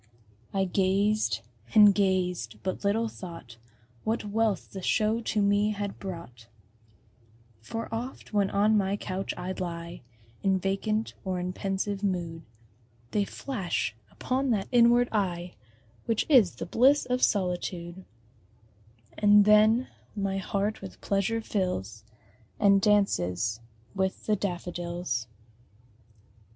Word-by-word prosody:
I 195 -1 +1
gazed 195 +3 +1 0.3
and 210 -2 +8
gazed 180 - 0
but 185 - -3
little 220 +3 +1
thought 165 - -10 0.5
What 220 0 -1
wealth 215 -1 0
the 190 - -6
show 220 +4 +1
to 215 -2 0
me 205 +1 +2
had 205 -1 -5
brought; 165 - -8 1.1
For 225 - -5
oft, 240 0 -6
when 200 -2 +2
on 210 +2 +3
my 200 -1 +1
couch 190 -1 -4
I 180 +1 -4
lie 170 -2 -5 0.4
In 195 -1 +2
vacant 195 +4 -1
or 185 -2 -2
in 180 +1 -3
pensive 195 +1 -2
mood, 175 -5 -2 0.7
They 205 -1 +1
flash 190 - -3
upon 265 +1 -1
that 210 -5 0
inward 240 0 +5
eye 180 -4 -1 0.5
Which 225 -2 +1
is 240 - +5
the - - -5
bliss 265 +9 +4
of 250 0 -1
solitude; 180 -2 -1 1.2
And 205 -1 +6
then 215 +4 +5 0.3
my 195 -1 -1
heart 200 +2 -2
with 195 - -9
pleasure 200 +3 0
fills, 180 - -3 0.6
And 200 -1 +5
dances 110 - +1 0.3
with 190 -1 -2
the 215 - +2
daffodils. 175 - -3
195 Hz, 120 wpm, -28 LUFS, 180-215 Hz, 1.2 s, and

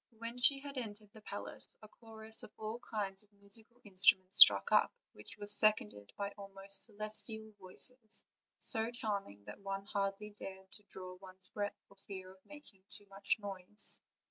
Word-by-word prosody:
When 230 +2 -6
she 275 +2 +8
had 280 -1 -6
entered 210 -3 -8
the 220 - -13
palace 205 -1 0
a - - -11
chorus 220 0 -6
of - - -10
all 220 +2 -5
kinds 200 -5 -5
of 210 - -28
musical 215 +4 -10
in 195 -2 -16
struments 185 0 +4
struck 100 -1 +9
up, - - +4 0.2
which 105 - -13
was 205 0 +2
seconded 105 - +1
by 200 0 -3
almost 195 0 +3
celestial 220 0 -2
voices, 220 +4 -1 0.3
so 225 -1 +4
charming 205 - -5
that - - -10
one 195 0 -5
hardly 200 +1 -3
dared 190 -2 -10
to 210 - -12
draw 185 -1 -9
one's 185 0 -16
breath 205 -1 -4
for 200 - -21
fear 190 -1 -10
of 190 0 -21
making 295 -10 -12
too 205 - -10
much 195 0 +1
noise. 200 0 -6
205 Hz, 170 wpm, -35 LUFS, 195-220 Hz, 0.3 s, struck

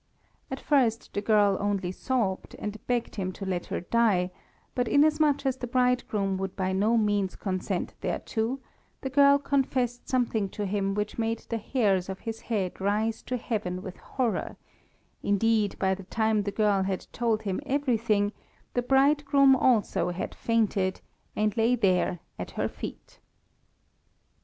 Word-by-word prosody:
At - - -4
first 245 -6 +1
the 205 - -1
girl 205 -2 +4
only 200 -3 -1
sobbed, 200 -2 -2
and 210 0 -6
begged 240 -3 -1
him 185 -2 -2
to 195 - -7
let 180 -2 -2
her - - -3
die; 190 -3 +2 0.4
but 245 -1 0
inasmuch 300 0 +3
as 265 -1 +1
the 250 - -5
bridegroom 240 -6 +1
would 190 0 -4
by 190 -1 -1
no 215 +5 +3
means 205 -3 +1
consent 185 -3 -3
thereto, 230 +4 -2 0.4
the 265 - -4
girl 280 +1 +6
confessed 260 -3 -1
something 235 -6 +1
to 205 +2 -4
him 195 0 -1
which 210 +2 -3
made 225 0 -1
the 230 - -1
hairs 200 -6 +1
of 190 - -5
his 225 -1 -5
head 195 -6 -2
rise 215 +3 0
to 250 - -3
heaven 200 -6 -3
with 190 -3 -7
horror; 250 -4 -2 0.6
indeed, 210 0 +2
by 190 -1 +2
the 190 0 -7
time 220 +1 +1
the 200 0 -3
girl 205 -2 +2
had 190 -1 -2
told 225 -2 0
him 195 +3 -2
everything, 230 -7 +1 0.4
the 245 - +1
bridegroom 275 +1 +4
also 210 -8 +2
had 180 +1 -4
fainted, 210 -5 0 0.4
and 215 0 +1
lay 230 +2 +3
there 185 -5 +1 0.2
at - - -4
her - - +1
feet. - - -9
215 Hz, 155 wpm, -28 LUFS, 195-245 Hz, 0.6 s, girl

